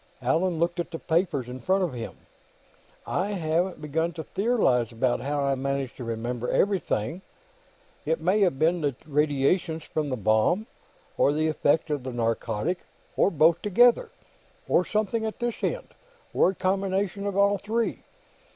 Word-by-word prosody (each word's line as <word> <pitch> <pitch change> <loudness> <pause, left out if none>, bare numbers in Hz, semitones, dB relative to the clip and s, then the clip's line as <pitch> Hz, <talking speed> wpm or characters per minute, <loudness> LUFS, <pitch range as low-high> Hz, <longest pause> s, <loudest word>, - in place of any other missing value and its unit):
Allan 165 +7 +1
looked 170 +2 0
at 170 - -2
the 165 - -5
papers 160 -6 0
in 125 +1 -7
front 190 +6 +1
of 170 -7 -2
him. 115 -2 -6 0.9
"I 200 +3 -1
haven't 175 0 0
begun 160 +3 -1
to 160 - -6
theorize 190 - +1
about 120 +2 0
how 145 +2 -1
I 140 0 +2
managed 135 -1 -2
to 125 - -6
remember 120 +1 -3
everything. 175 - 0 0.8
It 160 +2 0
may 185 +6 +2
have 180 -9 +2
been 165 +4 +2
the 145 -4 0
radiations 150 +3 +1
from 155 -3 -3
the 130 - -2
bomb, 110 - +2 0.5
or - - +5
the 155 +2 +1
effect 155 0 +1
of 145 -2 -1
the 130 +1 -5
narcotic, 115 - -1 0.4
or - - +4
both 165 0 +3
together, 240 - +4 0.6
or - - +3
something 215 +2 -1
at 220 -1 -3
this 240 -1 -3
end, - - -2 0.4
or - - +4
a 190 - -3
combination 195 +1 -1
of 200 -1 -2
all 200 0 +3
three. 225 +3 -1
160 Hz, 160 wpm, -26 LUFS, 135-190 Hz, 0.9 s, or